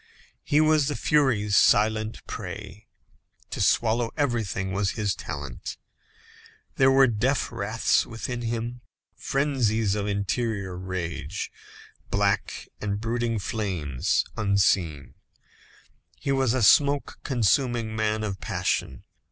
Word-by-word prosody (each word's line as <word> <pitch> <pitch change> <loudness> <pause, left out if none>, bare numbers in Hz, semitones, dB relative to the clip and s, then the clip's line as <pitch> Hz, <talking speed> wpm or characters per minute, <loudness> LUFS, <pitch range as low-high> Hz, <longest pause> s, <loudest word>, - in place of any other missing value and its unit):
He 145 - +2
was 155 -2 +4
the 145 - -1
furies' 115 -9 +2
silent 110 +2 +3
prey. 100 +1 -7 0.6
To - - -3
swallow 115 0 +2
everything 115 -9 -1
was 100 0 0
his 105 -2 0
talent. 70 -4 -6 1.0
There 135 0 +5
were 135 0 +6
deaf 125 +3 0
wraths 110 +3 +1
within 120 +1 -5
him, 120 +1 -3 0.3
frenzies 120 -7 0
of 105 -1 -2
interior 100 -1 -2
rage, 90 -2 -4 0.6
black 100 0 0
and 100 -1 -2
brooding 115 +1 -1
flames 95 - -1
unseen; 95 -8 +1 1.0
he 140 - -2
was 135 -3 +2
a 125 - +1
smoke 140 +6 +4
consuming 120 -2 +1
man 110 0 0
of 100 -3 -3
passion. 90 -8 -2
110 Hz, 110 wpm, -26 LUFS, 100-120 Hz, 1.0 s, were